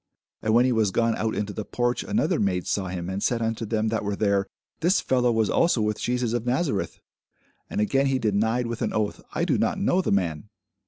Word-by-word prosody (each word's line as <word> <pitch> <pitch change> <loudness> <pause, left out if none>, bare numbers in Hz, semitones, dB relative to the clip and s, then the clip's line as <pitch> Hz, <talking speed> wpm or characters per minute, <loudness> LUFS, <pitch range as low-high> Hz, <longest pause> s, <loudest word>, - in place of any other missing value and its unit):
And 110 +1 +1
when 120 +1 +5
he 130 - +2
was 110 -4 +2
gone 115 +3 +1
out 110 0 -1
into 105 0 -3
the 110 - -4
porch, 120 +3 -1
another 200 -5 0
maid 90 -3 0
saw 95 -2 -1
him, 90 -1 -4
and 95 +1 -3
said 120 +2 +1
unto 115 0 -2
them 110 0 0
that 110 -1 -1
were 100 0 -2
there, 100 -2 +1 0.3
This 175 +4 +3
fellow 125 -2 +2
was 110 -2 +2
also 165 -1 +2
with 105 -1 0
Jesus 125 -2 0
of 120 -2 -1
Nazareth. 125 - -1 0.7
And - - -3
again 135 +6 +2
he 135 -1 +1
denied 110 +2 +1
with 115 0 -4
an 110 - -1
oath, 105 -1 -1
I - - 0
do - - +1
not - - +1
know 185 - +2
the - - -2
man. 90 -1 -1
110 Hz, 225 wpm, -25 LUFS, 105-125 Hz, 0.7 s, when